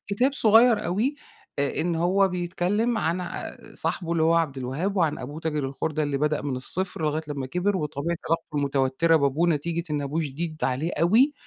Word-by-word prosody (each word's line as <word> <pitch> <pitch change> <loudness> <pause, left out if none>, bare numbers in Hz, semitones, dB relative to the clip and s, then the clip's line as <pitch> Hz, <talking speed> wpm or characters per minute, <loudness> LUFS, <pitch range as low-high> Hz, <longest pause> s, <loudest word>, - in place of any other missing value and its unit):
كتاب 245 +7 +1
صغير 225 -2 +5
أوي 215 +11 0 0.4
أ 140 -1 0
إن 170 +1 0
هو 190 +4 +3
بيتكلّم 185 +6 0
عن 170 0 0
ع 180 - -6 0.2
صاحبه 170 -2 -1
اللي 165 -1 +1
هو 165 +1 +4
عبد 155 -5 0
الوهاب 145 +11 -2
وعن 165 -5 +1
أبوه 145 +5 -7
تاجر 150 -3 -2
الخُردة 155 +3 -2
اللي 145 -2 -1
بدأ 150 +1 0
من 135 -3 -2
الصفر 180 +6 -2
لغاية 155 +1 0
لمّا 140 -3 -3
كبر 180 +8 0
وطبيعة 155 +1 -2
علاقته 165 -2 -1
المتوتّرة 140 +3 +2
بابوه 150 +4 +2
نتيجة 165 +2 0
إن 145 -1 -1
أبوه 145 +4 -2
شديد 155 +2 -4
عليه 135 +6 0
أوي 225 - +4
165 Hz, 185 wpm, -25 LUFS, 145-180 Hz, 0.4 s, صغير